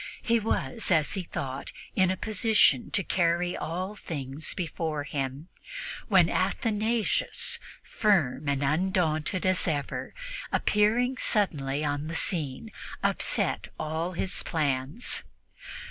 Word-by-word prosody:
He 235 Hz, 0 st, +3 dB
was, 225 Hz, +1 st, -1 dB
as 160 Hz, -5 st, +3 dB
he 195 Hz, -, -1 dB
thought, 135 Hz, -5 st, -5 dB, 0.2 s
in 185 Hz, -1 st, +4 dB
a 185 Hz, -, 0 dB
position 215 Hz, -, +3 dB
to 195 Hz, -, +1 dB
carry 175 Hz, 0 st, +1 dB
all 185 Hz, +5 st, -3 dB
things 145 Hz, -5 st, -4 dB
before 160 Hz, -3 st, -2 dB
him, 140 Hz, 0 st, -4 dB, 0.6 s
when -, -, +5 dB
Athanasius, 220 Hz, 0 st, +1 dB, 0.2 s
firm 155 Hz, -, +1 dB
and 140 Hz, 0 st, 0 dB
undaunted 165 Hz, +2 st, +1 dB
as 185 Hz, 0 st, +3 dB
ever, 145 Hz, -4 st, -2 dB, 0.4 s
appearing 235 Hz, +5 st, +2 dB
suddenly 150 Hz, -8 st, +1 dB
on 145 Hz, +1 st, -1 dB
the 165 Hz, -, -4 dB
scene, 160 Hz, +4 st, 0 dB, 0.3 s
upset -, -, 0 dB
all 160 Hz, +3 st, -2 dB
his 180 Hz, +1 st, -1 dB
plans. 145 Hz, -, 0 dB
170 Hz, 115 wpm, -28 LUFS, 145-200 Hz, 0.6 s, when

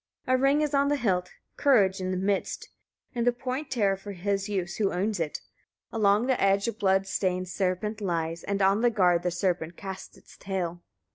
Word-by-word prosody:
9. 255 Hz, -, +3 dB
A -, -, +1 dB
ring 275 Hz, +3 st, +3 dB
is 300 Hz, -1 st, -1 dB
on 280 Hz, 0 st, +3 dB
the 290 Hz, -, +2 dB
hilt, 185 Hz, -9 st, 0 dB, 0.3 s
courage 200 Hz, -9 st, +3 dB
in 185 Hz, -, -2 dB
the 185 Hz, -, -1 dB
midst, 195 Hz, +1 st, -1 dB, 0.4 s
in 240 Hz, -2 st, -1 dB
the 245 Hz, -, +4 dB
point 260 Hz, +4 st, -4 dB
terror 205 Hz, -6 st, +2 dB
for 200 Hz, +1 st, -8 dB
his 200 Hz, +2 st, -2 dB
use 180 Hz, -4 st, -2 dB
who 200 Hz, -3 st, +1 dB
owns 200 Hz, +2 st, -1 dB
it: 160 Hz, -3 st, -3 dB, 0.5 s
along 210 Hz, 0 st, +3 dB
the 260 Hz, -1 st, +1 dB
edge 195 Hz, +1 st, +3 dB
a 230 Hz, -, -1 dB
blood 195 Hz, -2 st, +2 dB
stained 185 Hz, -1 st, -1 dB
serpent 195 Hz, +4 st, -2 dB
lies, 165 Hz, -3 st, -2 dB
and 200 Hz, 0 st, -1 dB
on 195 Hz, +3 st, +3 dB
the 240 Hz, -, +4 dB
guard 180 Hz, -6 st, +3 dB
the 180 Hz, -, 0 dB
serpent 175 Hz, -2 st, -2 dB
casts 190 Hz, -1 st, -8 dB
its -, -, -18 dB
tail. 175 Hz, -3 st, -3 dB
195 Hz, 205 wpm, -27 LUFS, 185-225 Hz, 0.5 s, the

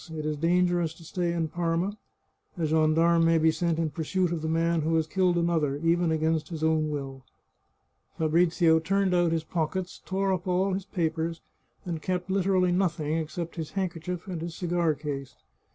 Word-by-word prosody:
It 155 Hz, -1 st, -5 dB
is 155 Hz, 0 st, -1 dB
dangerous 175 Hz, 0 st, +1 dB
to 165 Hz, -, -15 dB
stay 175 Hz, +1 st, -2 dB
in 170 Hz, -1 st, -1 dB
Parma. 175 Hz, +4 st, -1 dB, 0.6 s
A 165 Hz, -, 0 dB
gendarme 160 Hz, +2 st, +3 dB
may 165 Hz, 0 st, +4 dB
be 160 Hz, 0 st, +4 dB
sent 165 Hz, 0 st, -1 dB
in 165 Hz, -2 st, -1 dB
pursuit 170 Hz, +4 st, -1 dB
of 170 Hz, -2 st, -2 dB
the 160 Hz, -, -3 dB
man 165 Hz, +1 st, +1 dB
who 160 Hz, +2 st, 0 dB
has 160 Hz, -1 st, +2 dB
killed 180 Hz, +1 st, +1 dB
another, 165 Hz, -5 st, +1 dB
even 165 Hz, +2 st, +2 dB
against 160 Hz, -1 st, 0 dB
his 160 Hz, -2 st, -5 dB
own 160 Hz, -1 st, +2 dB
will." 135 Hz, -3 st, -5 dB, 0.9 s
Fabrizio 165 Hz, +1 st, +3 dB
turned 195 Hz, +3 st, +1 dB
out 175 Hz, -2 st, +3 dB
his 165 Hz, -1 st, 0 dB
pockets, 180 Hz, +2 st, -3 dB
tore 195 Hz, 0 st, 0 dB
up 180 Hz, 0 st, -3 dB
all 185 Hz, +2 st, +1 dB
his 190 Hz, 0 st, -3 dB
papers, 165 Hz, -3 st, -2 dB, 0.4 s
and 165 Hz, -3 st, -4 dB
kept 180 Hz, +1 st, -2 dB
literally 190 Hz, -1 st, +2 dB
nothing 170 Hz, -4 st, 0 dB
except 165 Hz, +2 st, -4 dB
his 160 Hz, -2 st, -5 dB
handkerchief 180 Hz, -2 st, -3 dB
and 180 Hz, -5 st, -5 dB
his 170 Hz, 0 st, -5 dB
cigar 175 Hz, -3 st, 0 dB
case. 140 Hz, -3 st, -5 dB
165 Hz, 180 wpm, -27 LUFS, 160-180 Hz, 0.9 s, may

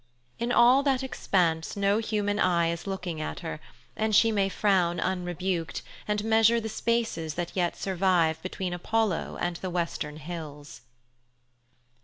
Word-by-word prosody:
In 235 Hz, +1 st, -1 dB
all 245 Hz, +3 st, +6 dB
that 270 Hz, -2 st, +1 dB
expanse 175 Hz, -10 st, 0 dB
no 200 Hz, +1 st, +2 dB
human 205 Hz, -2 st, -1 dB
eye 170 Hz, -2 st, +3 dB
is 170 Hz, +3 st, -6 dB
looking 180 Hz, -5 st, -4 dB
at 155 Hz, -, -5 dB
her, 160 Hz, -3 st, -5 dB, 0.4 s
and 215 Hz, -1 st, +1 dB
she 225 Hz, +2 st, +5 dB
may 200 Hz, -2 st, +1 dB
frown 185 Hz, -4 st, +2 dB
unrebuked 180 Hz, -2 st, -2 dB, 0.2 s
and 210 Hz, 0 st, 0 dB
measure 225 Hz, +1 st, +4 dB
the 220 Hz, -1 st, -4 dB
spaces 220 Hz, -9 st, -1 dB
that 175 Hz, 0 st, -4 dB
yet 175 Hz, -2 st, 0 dB
survive 175 Hz, -4 st, +1 dB
between 185 Hz, 0 st, -4 dB
Apollo 210 Hz, +1 st, -1 dB
and 175 Hz, -1 st, -1 dB
the 185 Hz, -, -5 dB
western 170 Hz, -4 st, -3 dB
hills. 150 Hz, -2 st, -8 dB
185 Hz, 145 wpm, -27 LUFS, 170-215 Hz, 0.4 s, all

